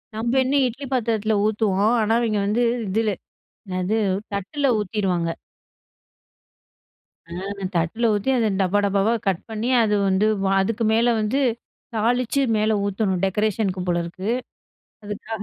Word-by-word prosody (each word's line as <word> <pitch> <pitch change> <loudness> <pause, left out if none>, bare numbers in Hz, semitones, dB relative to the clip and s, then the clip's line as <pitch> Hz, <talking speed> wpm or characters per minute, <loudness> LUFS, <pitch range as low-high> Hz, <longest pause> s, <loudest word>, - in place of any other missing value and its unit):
நம்ம 235 +4 0
என்ன 265 +2 0
இட்லி 250 +4 -6
பாத்திரத்தில 220 -3 0
ஊத்துவோம். 215 +1 +2
ஆனா 220 +1 +1
இவங்க 215 -3 0
வந்து 225 +4 +1 0.3
இதில, 220 +3 +1 0.6
என்னது 185 +3 -1 0.4
தட்டுல 235 +9 -1
ஊத்திருவாங்க. 185 -4 -1 2.0
ஆ - - -24 0.5
தட்ல 170 +8 0
ஊத்தி 205 +5 -1
அத 230 -2 +2
டப்பா, 190 +2 +2
டப்பாவா 200 +3 +2
கட் 190 -3 +1
பண்ணி 220 +2 -2
அது 210 -1 +2
வந்து 190 +2 +2 0.2
வ - - 0 0.2
அதுக்கு 225 +3 -1
மேலே 235 +2 +3
வந்து 215 +6 0 0.6
தாளிச்சு, 245 +5 +1
மேல 215 +1 +2
ஊத்தணும் 200 -2 0
டெக்கரேஷனுக்கு 195 -1 0
போல 175 -1 +1
இருக்கு. 185 +4 -5 0.8
அதுக்காக, 210 +1 -6
215 Hz, 130 wpm, -23 LUFS, 195-225 Hz, 2.0 s, மேலே